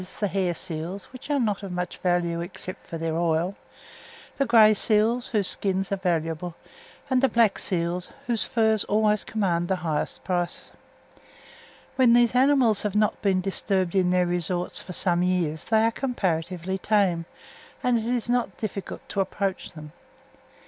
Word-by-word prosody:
the 210 - +1
hair 185 -3 -1
seals, 175 +3 -5
which 255 +3 -11
are 290 -1 +2
not 210 -5 0
of 195 -2 -7
much 180 0 -4
value 175 -2 0
except 180 +1 -8
for 165 - -5
their 165 0 -2
oil; 170 +2 0 0.8
the 275 - +1
grey 220 -2 +7
seals, 220 +3 +2
whose 210 -5 +1
skins 195 -1 +1
are - - +2
valuable; 170 -2 -2 0.5
and 260 -1 +2
the 270 - +4
black 230 -3 +3
seals, 175 0 -2 0.2
whose 235 -3 0
furs 220 -2 +1
always 210 0 +2
command 175 -6 -1
the 190 - +1
highest 155 -2 -2
price. 175 -1 -3 1.3
When 250 -3 +5
these 240 0 +4
animals 255 -4 +3
have 210 -1 -3
not 210 0 +1
been 190 -2 +2
disturbed 190 -1 0
in 185 -2 +2
their 180 0 +3
resorts 175 0 -2
for 180 - -9
some 175 0 +1
years 175 -4 0
they 220 -1 +3
are 225 - +3
comparatively 185 -7 -2
tame, 185 -5 +1 0.6
and 245 -2 +2
it 220 - -5
is 240 -1 -1
not 245 0 0
difficult 200 -3 -6
to 200 - 0
approach 195 0 -3
them. 155 -2 -10
190 Hz, 165 wpm, -25 LUFS, 175-220 Hz, 1.3 s, grey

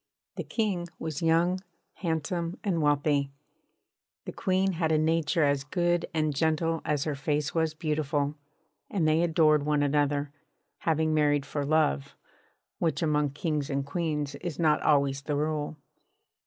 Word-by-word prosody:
The - - -4
King 195 -7 -1
was 155 -3 -4
young, 170 +3 +2 0.4
handsome, 170 +2 -2
and 185 -6 0
wealthy; 145 -1 +2 1.0
the - - -5
Queen 190 -1 +1
had 160 -2 0
a 155 - +4
nature 160 +1 +2
as 140 -1 +2
good 175 +3 0
and 155 -2 0
gentle 160 +2 0
as 145 -2 0
her 155 - -1
face 145 +1 -1
was 160 -1 0
beautiful; 150 -3 -1 0.6
and 175 -6 +1
they 155 +1 +3
adored 155 -3 +4
one 150 0 +1
another, 145 0 +1 0.5
having 160 -1 +1
married 145 -2 +2
for 145 0 -3
love 140 - +1 0.6
which 160 -2 0
among 150 -2 +1
kings 150 -1 -2
and 140 -1 -1
queens 150 -2 -2
is 175 -4 -5
not 155 -3 +3
always 140 -2 +2
the 145 +1 -2
rule. 150 0 -2
155 Hz, 145 wpm, -28 LUFS, 145-165 Hz, 1.0 s, a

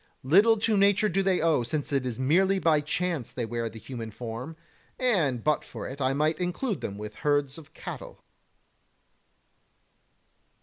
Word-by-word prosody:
Little 200 - +5
to 220 +1 +1
nature 200 +1 +4
do 195 +3 +1
they 190 -1 +2
owe, 160 -5 +3
since 145 +4 -3
it 135 -2 +1
is 120 -3 -4
merely 185 +9 +3
by 160 -5 +3
chance 160 -3 -2
they 120 - -3
wear 115 0 -3
the 110 - -11
human 115 -1 -7
form, 120 +7 -7 0.4
and 165 - +1
but 150 0 +1
for - - -7
it 140 +2 -7
I 130 0 +2
might 155 +3 +1
include 180 - -2
them 100 - -5
with 105 0 -8
herds 145 0 +1
of 155 - -17
cattle. - - -8
150 Hz, 165 wpm, -27 LUFS, 125-185 Hz, 0.4 s, Little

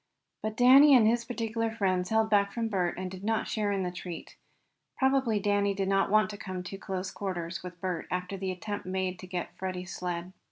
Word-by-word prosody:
But 215 0 -4
Danny 270 +3 +8
and 235 -4 +6
his 235 +1 +2
particular 230 -2 -2
friends 185 -5 0
held 220 0 +3
back 200 -1 +4
from 230 0 -2
Bert, 180 -4 0
and 185 0 -4
did 190 0 -9
not 225 +1 0
share 210 -2 0
in 195 -1 0
the 180 - -2
treat. 175 -1 -8 0.6
Probably 265 -5 +2
Danny 200 0 +1
did 195 -1 -1
not 195 0 +2
want 215 0 +3
to 205 - -7
come 185 -2 -5
to 180 - -7
too 195 - -7
close 190 -1 -4
quarters 175 -3 -4
with 180 -1 -9
Bert 180 -2 -3
after 180 +2 -3
the 190 -1 -3
attempt 205 +2 -5
made 185 -1 -2
to 185 - -9
get 180 -1 -4
Freddie's 185 -1 -4
sled. 180 0 -4
195 Hz, 215 wpm, -29 LUFS, 185-220 Hz, 0.6 s, Danny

